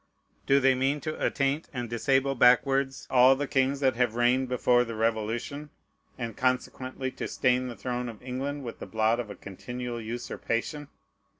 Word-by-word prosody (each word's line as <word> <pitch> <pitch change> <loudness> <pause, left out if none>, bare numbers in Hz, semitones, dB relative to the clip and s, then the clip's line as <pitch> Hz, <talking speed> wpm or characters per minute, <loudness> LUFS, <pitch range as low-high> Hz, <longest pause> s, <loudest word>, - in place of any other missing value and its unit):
Do 140 +1 +5
they 135 -1 +4
mean 135 +3 0
to 155 +3 -4
attaint 140 +3 0
and 125 -4 -4
disable 135 +4 +1
backwards 135 +2 +3
all 130 +1 +7
the 145 +2 -2
kings 135 0 +1
that 130 -3 +3
have 125 -2 +1
reigned 125 +2 +2
before 125 -1 +3
the 115 -1 -6
Revolution, 115 +6 -2 0.5
and 115 -4 -5
consequently 130 +1 -2
to - - -5
stain 125 0 +1
the 120 - -6
throne 125 +3 -3
of 110 -3 -10
England 135 +3 -4
with 120 - -7
the - - -7
blot 110 +1 +1
of 115 -3 -4
a 100 - -7
continual 120 +6 -6
usurpation? 120 +4 -4
125 Hz, 170 wpm, -28 LUFS, 120-135 Hz, 0.5 s, all